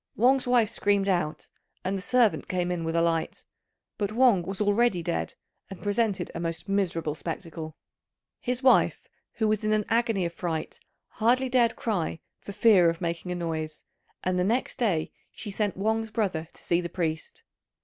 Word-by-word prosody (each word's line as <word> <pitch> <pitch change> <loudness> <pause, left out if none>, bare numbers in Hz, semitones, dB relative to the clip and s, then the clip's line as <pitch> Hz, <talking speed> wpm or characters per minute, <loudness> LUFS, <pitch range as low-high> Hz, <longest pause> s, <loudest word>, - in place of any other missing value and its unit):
Wang's 255 +3 +3
wife 240 -3 +3
screamed 200 -1 +1
out, 175 -5 -1 0.3
and 190 +2 0
the 190 - -3
servant 240 +1 +2
came 180 -1 -1
in 175 -2 -2
with 165 0 -2
a 165 - +3
light; 165 -1 -1 0.6
but 205 -1 -1
Wang 235 -4 +4
was 190 +2 -5
already 205 -3 +2
dead 80 - -2 0.3
and 195 - -10
presented 205 -1 0
a - - -5
most 165 +2 -4
miserable 175 -6 0
spectacle. 160 -1 -6 0.6
His 250 +1 -2
wife, 260 - +4 0.3
who 220 - 0
was 215 0 +1
in 215 0 +2
an 210 -1 +1
agony 225 -5 +2
of 170 - -3
fright, 165 -3 -4 0.3
hardly 250 +4 +2
dared 240 -2 +3
cry 180 -7 -2 0.2
for - - -8
fear 195 -5 +5
of 165 0 -3
making 170 +1 -3
a - - -1
noise; 160 -3 -4 0.4
and 185 0 0
next 220 +8 0
day 185 -10 +1 0.2
she 210 - -7
sent 205 -1 -1
Wang's 220 +2 0
brother 190 -8 -1
to - - -12
see 170 0 +2
the 170 - -5
priest. 160 -3 -3
195 Hz, 175 wpm, -27 LUFS, 170-220 Hz, 0.6 s, fear